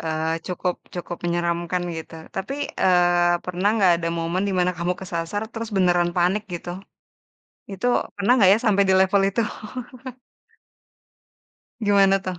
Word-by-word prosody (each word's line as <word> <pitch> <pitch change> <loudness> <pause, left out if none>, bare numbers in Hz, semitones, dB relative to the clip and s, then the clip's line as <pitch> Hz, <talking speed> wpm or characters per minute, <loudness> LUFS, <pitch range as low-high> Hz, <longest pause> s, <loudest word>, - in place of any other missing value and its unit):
Eee, 160 0 -1
cukup 180 -1 -2 0.2
cukup 175 -1 -5
menyeramkan 170 +1 -1
gitu 160 0 -8 0.2
tapi, 220 +8 -3 0.3
eee, 175 -1 +3
pernah 180 +2 0
nggak, 190 -5 +5
ada 170 0 -3
momen 170 +3 -1
di - - -1
mana 180 0 +3
kamu 175 +1 -1
kesasar, 175 +2 -3
terus 225 0 -5
beneran 175 -2 +3
panik 180 +4 +2
gitu? 175 0 -6 1.0
Itu 195 +4 -5 0.3
pernah 200 +3 +1
nggak 195 -6 +6
ya - - +3
sampai 200 -2 +4
di - - +5
level 190 +1 +3
itu? 215 +4 0 2.4
Gimana 200 -2 +4
tuh? 185 -2 -5
180 Hz, 140 wpm, -23 LUFS, 175-195 Hz, 2.4 s, nggak